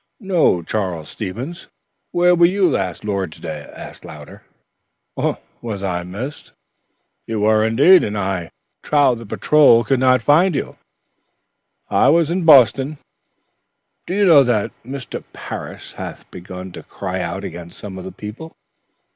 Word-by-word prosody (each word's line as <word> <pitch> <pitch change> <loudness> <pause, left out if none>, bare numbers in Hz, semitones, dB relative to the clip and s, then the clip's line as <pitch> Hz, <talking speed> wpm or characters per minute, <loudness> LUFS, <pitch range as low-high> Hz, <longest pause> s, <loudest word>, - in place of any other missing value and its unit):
"Ho, 165 - +2
Charles 90 -5 -3
Stevens, 120 - -6 0.4
where 180 0 +4
were 170 -1 +5
you 190 +1 +2
last 95 - -2
Lord's 100 -6 -3
Day?" 75 -2 -7
asked - - -11
Louder. - - -11 1.2
"Was 105 -5 -5
I 90 -2 -1
missed?" 105 +12 -7 0.7
"You 110 -2 -2
were, 110 +1 +3
and 110 +2 -1 0.4
I 95 -3 -2 0.3
trow 145 -4 +3
the 115 -2 -8
patrol 140 -1 +4
could 125 +3 +1
not 130 -2 +3
find 160 +6 +4
you." - - -4 1.1
"I - - +4
was 165 0 +3
in 180 -1 -1
Boston." 135 0 +5 1.1
"Do 185 - -2
you 205 0 +3
know 160 -6 +7
that 120 -6 +1
Mr. 130 +2 -7
Parris - - -8
hath - - -9
begun 90 +1 -9
to - - -9
cry - - -5
out - - -4
against 85 0 -8
some 95 -2 -8
of - - -8
the 95 - -7
people?" 115 +11 -9
115 Hz, 140 wpm, -19 LUFS, 95-150 Hz, 1.2 s, know